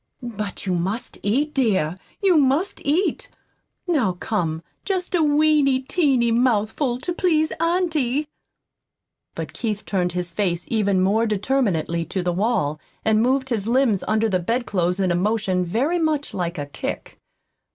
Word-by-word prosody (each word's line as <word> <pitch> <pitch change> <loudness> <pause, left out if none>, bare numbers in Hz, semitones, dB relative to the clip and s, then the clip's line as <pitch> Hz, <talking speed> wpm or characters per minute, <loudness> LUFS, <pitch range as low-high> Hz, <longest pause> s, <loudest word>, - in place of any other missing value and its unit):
But 215 -5 -5
you 185 - 0
must 190 +7 -3
eat, 280 +9 0
dear, 190 - +1 0.3
you 380 -3 +5
must 295 +6 +2
eat. 320 +8 0 0.6
Now, 265 - +2
come, 170 -4 -2 0.2
just 375 -2 -2
a 350 - +3
weeny, 295 -3 +3
teeny 265 -6 +2
mouthful 240 +2 +1
to 350 - -2
please 315 -3 +2
auntie!" 320 -5 +1 1.1
But - - -5
Keith 215 -3 -3
turned 180 -3 -1
his 180 -1 -3
face 180 -4 -1
even 200 -4 +2
more 215 +5 +2
determinedly 200 - 0
to 180 +3 -3
the 175 0 0
wall, 170 -7 0 0.3
and 220 0 +3
moved 260 +2 +1
his 220 -4 -1
limbs 235 -5 +2
under 215 +1 +2
the 190 -4 +1
bed 235 +8 -1
clothes 180 -2 0
in 185 -2 +2
a - - +2
motion 195 -1 +1
very 260 - 0
much 310 -3 0
like 175 -2 -3
a 145 - -3
kick. 145 - -6
225 Hz, 150 wpm, -22 LUFS, 185-280 Hz, 1.1 s, you